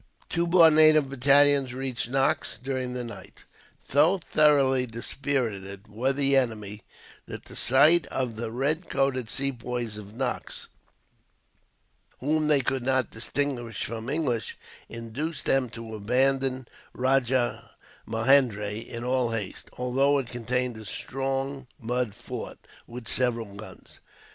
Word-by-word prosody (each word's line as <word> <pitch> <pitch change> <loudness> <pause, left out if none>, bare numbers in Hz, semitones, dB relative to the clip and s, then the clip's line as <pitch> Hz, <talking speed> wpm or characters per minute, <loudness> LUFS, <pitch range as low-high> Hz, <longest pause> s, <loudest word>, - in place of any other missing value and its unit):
Two 170 0 0
more 170 -2 +7
native 155 -2 +5
battalions 140 -1 +4
reached 130 -3 -3
Knox 135 -3 +1
during 130 0 -3
the 125 -1 -3
night. 120 - -11 0.4
So 155 +8 +4
thoroughly 140 -6 +3
dispirited 115 -5 -3
were 120 +6 0
the 140 0 +3
enemy, 105 -5 -1 0.5
that - - -8
the - - -12
sight 150 +7 +5
of 125 -4 -3
the 115 +1 -4
red 150 +8 -1
coated 135 -4 0
Sepoys 120 -4 -3
of 105 0 -10
Knox, 130 0 -4 1.5
whom 155 +3 0
they 150 -2 +4
could 135 +1 -1
not 130 0 0
distinguish 120 -1 -3
from 115 +2 -5
English, 135 - -2 0.3
induced 125 +7 -4
them 135 -2 +2
to 115 0 -9
abandon 130 +4 0 0.3
Rajahmahendri 125 -3 0
in 115 0 -6
all 125 -1 +1
haste, 110 -4 -5
although 135 +3 +1
it 130 -4 -3
contained 125 0 -2
a 110 - -10
strong 135 +3 -3
mud 120 -2 -2
fort, - - -7 0.3
with 120 -1 -9
several 115 -5 0
guns. 100 +2 -12
130 Hz, 125 wpm, -26 LUFS, 115-140 Hz, 1.5 s, more